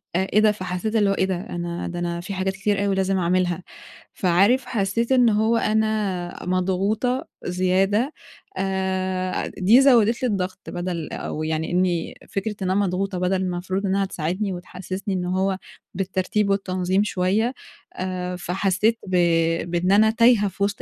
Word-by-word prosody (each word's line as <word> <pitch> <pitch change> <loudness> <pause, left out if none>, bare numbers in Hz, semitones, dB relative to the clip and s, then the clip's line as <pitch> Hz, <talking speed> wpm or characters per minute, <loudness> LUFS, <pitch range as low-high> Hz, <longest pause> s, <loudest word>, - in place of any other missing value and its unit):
أ 190 +2 +1
إيه 210 - +5
ده؟! 215 0 +5
فحسّيت 185 +2 -3
اللي 205 -3 +3
هو - - +3
إيه 190 - +1
ده؟! 190 -1 -1
أنا 175 0 -4
ده 175 0 -5
أنا 170 0 -2
في 190 +3 -6
حاجات 190 0 -1
كتير 200 0 0
أوي 200 -1 +1
لازم 190 0 +1
أعملها. 180 0 0 0.5
فعارف 200 +8 +3
حسّيت 230 +1 -1
إن 250 -3 +5
هو 220 +2 +2
أنا 215 -6 -1
مضغوطة 195 +7 0 0.2
زيادة 190 - +1 0.4
أ 190 -1 -1
دي 215 +8 +4
زوّدت 240 -3 +4
لي - - +3
الضغط. 190 -2 -2
بَدَل 175 -2 -4
أو 155 - -4
يعني 160 0 -2
إنّي 175 -2 0 0.2
فكرة 210 +2 -3
إن 185 - -1
أنا - - +1
مضغوطة 190 +1 -2
بَدَل 180 +1 +1
المفروض 185 +2 -2
إنّها 195 0 +1
تساعدني 185 +3 -2
وتحسّسني 185 +2 -5
إن 180 -1 -2
هو 190 +1 0 0.4
بالترتيب 195 +2 -1
والتنظيم 190 -1 +1
شوية. 210 +5 0 0.4
آآ 180 -1 -3
فحسّيت 195 +5 0
ب 185 - -1 0.6
بإن 175 +2 +1
أنا 215 +2 +6
تايهة 230 -2 +4
في 200 +1 -3
وِسط 200 0 -1
190 Hz, 160 wpm, -23 LUFS, 180-210 Hz, 0.6 s, أنا